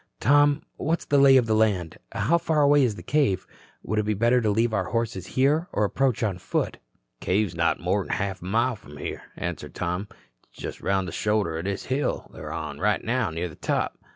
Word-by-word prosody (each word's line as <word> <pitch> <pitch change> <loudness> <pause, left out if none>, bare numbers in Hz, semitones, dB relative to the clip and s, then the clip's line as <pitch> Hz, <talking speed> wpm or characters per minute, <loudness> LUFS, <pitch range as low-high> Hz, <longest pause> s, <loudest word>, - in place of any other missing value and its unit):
Tom, 145 +1 +4
what's 165 +3 -1
the 145 - +3
lay 135 -1 +7
of 125 - +3
the 110 - +1
land? 100 -7 +1
How 150 - +2
far 155 -2 +2
away 145 0 +5
is 115 -5 +1
the - - -10
cave? 125 -10 +1 0.4
Would 110 - -1
it - - +1
be 105 0 0
better 120 +4 +3
to 110 - +1
leave 115 +2 +1
our 100 -3 0
horses 110 -4 -2
here 150 +6 +3
and 105 - +1
approach 130 +2 0
on 100 -5 -1
foot?" - - -2 0.4
"Cave's 95 -1 0
not 85 0 +1
more'n 95 +3 -1
half 95 -2 -2
a - - -9
mile 115 +6 +1
from 75 -8 -13
here," - - -5 0.2
answered - - -5
Tom. 90 +3 -2 0.4
"It's - - -25
just - - -6
around 95 -1 +1
the 90 - -5
shoulder 105 -4 0
o' 80 - -2
this 100 +2 -3
hill 135 +3 -2
we're - - -8
on - - -5
right - - +1
now 125 0 0
and 80 - -6
near 85 +2 -2
the 80 - -11
top. - - -2
110 Hz, 220 wpm, -25 LUFS, 95-130 Hz, 0.4 s, lay